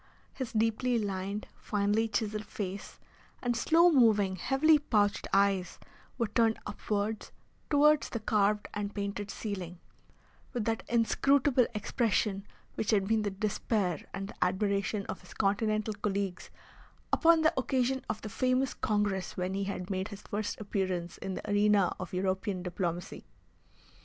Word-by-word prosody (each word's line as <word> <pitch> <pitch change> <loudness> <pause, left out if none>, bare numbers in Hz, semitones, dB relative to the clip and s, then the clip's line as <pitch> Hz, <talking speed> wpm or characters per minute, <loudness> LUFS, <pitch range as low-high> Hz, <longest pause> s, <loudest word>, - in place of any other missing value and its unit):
His 260 -4 -5
deeply 225 +2 +1
lined, 200 -1 -3
finely 210 +2 0
chiselled 215 0 -2
face 195 -1 -6 0.4
and 240 -1 -1
slow 335 +8 +5
moving, 215 - +4
heavily 285 - +4
pouched 210 -8 +1
eyes 195 -2 +2 0.4
were 235 - +1
turned 225 +1 +2
upwards 210 +1 -3 0.4
towards 300 0 +4
the 230 - -3
carved 210 -1 +1
and 205 0 -4
painted 200 0 -3
ceiling, 185 -6 -5 0.8
with 240 -4 -2
that 225 -1 0
inscrutable 255 +2 +3
expression 210 -2 0 0.3
which 215 - -3
had 200 -3 +3
been 220 0 +2
the 210 - -1
despair 200 -3 -1
and 195 0 -5
the - - -2
admiration 200 +2 0
of - - -6
his - - -14
Continental 215 +2 +1
colleagues 200 -2 -3 0.6
upon 330 -1 +5
the 315 +2 +4
occasion 260 0 0
of 215 - -3
the 215 - -5
famous 255 +3 +1
Congress 205 -4 -1
when 180 +1 -1
he 195 0 -1
had 195 -1 -4
made 190 0 -1
his 205 -2 -10
first 210 0 -3
appearance 185 -4 -2
in 190 -1 -4
the - - -7
arena 205 -2 +3
of 185 - -6
European 190 0 -1
diplomacy. 175 -1 -3
210 Hz, 140 wpm, -30 LUFS, 195-230 Hz, 0.8 s, slow